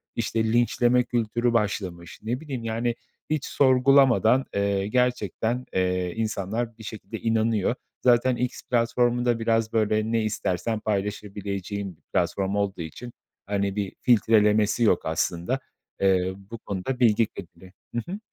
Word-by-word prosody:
işte, 115 -1 0
linçleme 120 +1 +3
kültürü 120 0 0
başlamış. 95 -6 -2
Ne 120 +3 -2
bileyim, 135 -6 -6
yani, 115 +1 -1 0.3
hiç 155 -2 -1
sorgulamadan, 130 -2 +4
eee, 100 -1 0
gerçekten, 125 0 0
eee, 90 -1 0
insanlar 110 +1 -2
bir 110 - -12
şekilde 105 -2 -7
inanıyor. 115 -1 +1 0.3
Zaten 125 +1 +4
X 125 +1 -3
platformu 120 0 +2
da 120 -1 +2
biraz, 115 0 +1
böyle, 110 0 +1
ne 115 -1 +1
istersen 105 0 -1
paylaşabileceğin 100 -2 -3
bir - - -36
platform 100 0 0
olduğu 100 -3 -1
için, 115 +10 -8 0.3
hani, 100 -1 -1
bir 100 -2 -3
filtrelemesi 105 -2 +3
yok 100 -6 +3
aslında. 85 +9 -1 0.4
Eee, 95 -1 +2
bu 100 +4 -10
konuda 110 +5 -4
bilgi 115 -2 +4
kirliliği 90 0 -12 0.2
Hı 120 - 0
hı. 200 - -4
110 Hz, 135 wpm, -25 LUFS, 100-120 Hz, 0.4 s, sorgulamadan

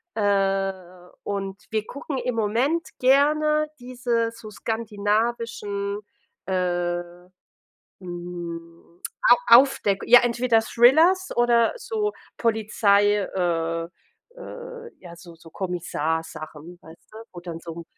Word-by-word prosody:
äh, 195 -3 -1
und 195 0 -4
wir 215 -1 -1
gucken 280 +2 -6
im 250 -1 -2
Moment 240 +10 0
gerne 300 +3 +3
diese 245 -2 -1
so 230 -1 -11
skandinavischen, 210 -1 -2 0.5
äh, 175 -2 -1 1.0
mm, 175 -1 -8 0.3
A 485 - +7
Aufdeck 240 -7 +2
ja, 245 +1 +8
entweder 240 -1 +2
Thrillers 320 +12 +4
oder 240 -1 +3
so 435 -3 -2 0.3
Polizei, 210 -2 +2
äh, 165 -3 -2 0.5
äh, 485 -1 -9
ja, 170 -2 -12
so 170 0 -13
so 165 0 -16
Kommissar-Sachen, 160 -2 -4
weißt 160 +1 -17
du? - - -10 0.2
Wo 175 - -8
dann 170 -2 -7
so 170 -1 -8
‘n 170 +1 -8
205 Hz, 105 wpm, -24 LUFS, 175-240 Hz, 1.0 s, ja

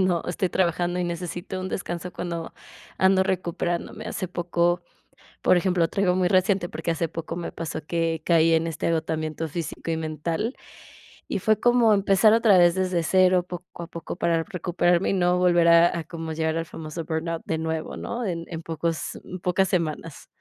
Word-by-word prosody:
cuando 180 -3 +2
estoy 180 +1 -1
trabajando 175 0 0
y 180 - 0
necesito 175 +2 -4
un 185 0 -4
descanso, 180 -1 -4
cuando 170 -2 -5 0.5
ando 190 0 +4
recuperándome. 175 -2 -2
Hace 185 - -4
poco 175 0 0 0.6
por 185 - +5
ejemplo, 175 -2 +2
traigo 185 -2 +1
muy 180 -1 +2
reciente 185 -1 +2
porque - - -4
hace 165 0 -1
poco 165 +1 -5
me 170 - -5
pasó 165 -2 -5
que 165 -1 -1
caí 165 -1 +4
en 160 0 +2
este 165 -2 -3
agotamiento 160 -1 -1
físico 165 +1 -4
y 160 - -1
mental, 160 - -3 0.7
y - - -2
fue 215 +3 +2
como 240 -1 +4
empezar 200 +2 +4
otra 225 -4 +5
vez 175 -1 +5
desde 185 -2 0
0, 185 +1 +4
poco 180 -1 -8
a - - -8
poco, 170 0 -7
para 165 -2 +1
recuperarme 175 -1 +1
y - - +1
no 180 -1 +2
volver 175 -2 +4
a 170 0 +5
a - - -4
como 165 0 -6
llegar 160 0 -1
al 165 - -2
famoso 160 +1 -7
burnout 165 +1 -3
de 160 - -1
nuevo, 160 0 -3
¿no?, 240 0 -4
en 170 -4 -3
en 165 -2 -5
pocos 165 0 -3
en 185 - -7
pocas 180 +2 +1
semanas. 165 -3 -3
175 Hz, 180 wpm, -25 LUFS, 165-185 Hz, 0.7 s, por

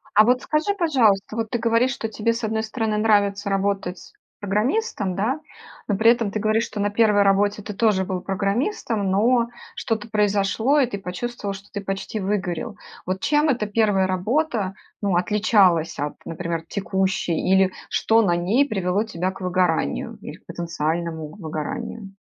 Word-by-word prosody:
А 215 - +7
вот 250 +2 +3
скажи, 315 +7 0
пожалуйста, 230 - +2
вот 225 -1 -2
ты 240 - -1
говоришь, 230 +2 +2
что 225 - -4
тебе, 220 +1 0
с 230 0 -5
одной 220 0 -1
стороны, 220 -1 -2
нравится 205 -2 +2
работать 195 -2 -2 0.3
программистом, 210 - -1
да, 240 +9 0 0.5
но 205 - +1
при 225 +2 +6
этом 235 -3 0
ты 210 - -3
говоришь, 220 +2 +1
что 210 - -5
на 205 - +1
1 205 -1 +4
работе 205 +1 +2
ты 210 - -6
тоже 205 -2 +2
был 185 0 -3
программистом, 200 - -1
но 230 +5 +3 0.3
что-то 225 0 -3
произошло 210 +6 +2
и 275 - +4
ты 220 -5 -5
почувствовал, 200 +3 -4
что 195 +1 -11
ты 205 - -4
почти 195 +2 -4
выгорел. 200 +2 -2 0.3
Вот 185 +1 -2
чем 295 +1 +2
эта 245 -7 +1
1 205 -2 +2
работа, 200 - 0 0.3
ну, 200 -4 +1
отличалась 185 -3 +3
от, 145 +1 -3
например, 165 0 -4
текущей 190 -4 -1
или 190 0 +3 0.2
что 225 +1 +3
на 175 -5 +2
ней 205 +12 +2
привело 195 -1 0
тебя 185 -3 -2
к - - -12
выгоранию 180 - 0
или - - -8
к - - -22
потенциальному 165 -1 -3
выгоранию? 195 +6 -5
205 Hz, 165 wpm, -23 LUFS, 190-225 Hz, 0.5 s, А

